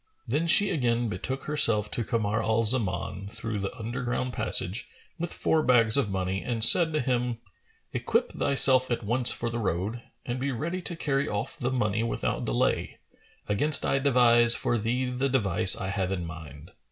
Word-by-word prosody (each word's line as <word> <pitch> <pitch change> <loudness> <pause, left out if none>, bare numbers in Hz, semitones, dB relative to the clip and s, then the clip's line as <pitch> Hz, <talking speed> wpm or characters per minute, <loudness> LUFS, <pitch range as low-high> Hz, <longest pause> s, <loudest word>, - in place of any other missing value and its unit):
Then 165 +3 -1
she 200 +5 +4
again 120 -5 0
betook 130 +8 -5
herself 115 -8 +1
to 120 - -2
Kamar 110 -2 -1
al 110 +1 0
Zaman 100 -4 0
through 110 0 -5
the 100 0 -4
underground 125 +2 -4
passage, 110 -2 +1 0.3
with 170 0 -4
four 160 - 0
bags 115 -5 +3
of 140 -7 +1
money, 95 0 -3
and 115 -2 -2
said 165 +7 +9
to 155 - 0
him, 125 -2 -1 0.6
"Equip - - -1
thyself 130 -2 +2
at 120 -1 -2
once 120 +4 +1
for 120 0 -3
the 120 - -4
road 105 +3 -3 0.2
and 120 +1 -4
be 140 +2 -2
ready 170 +9 -4
to 175 - -5
carry 140 -4 -1
off 105 -1 -4
the 125 - -3
money 110 -4 -1
without 115 - -3
delay, - - -1 0.5
against 145 +9 +2
I 135 - +1
devise 120 -3 +4
for 120 - -1
thee 120 +4 -1
the 130 +2 -1
device 95 -8 +2
I 95 - -5
have 95 -2 -2
in 90 -3 -3
mind." 80 -3 -11
120 Hz, 175 wpm, -26 LUFS, 105-130 Hz, 0.6 s, said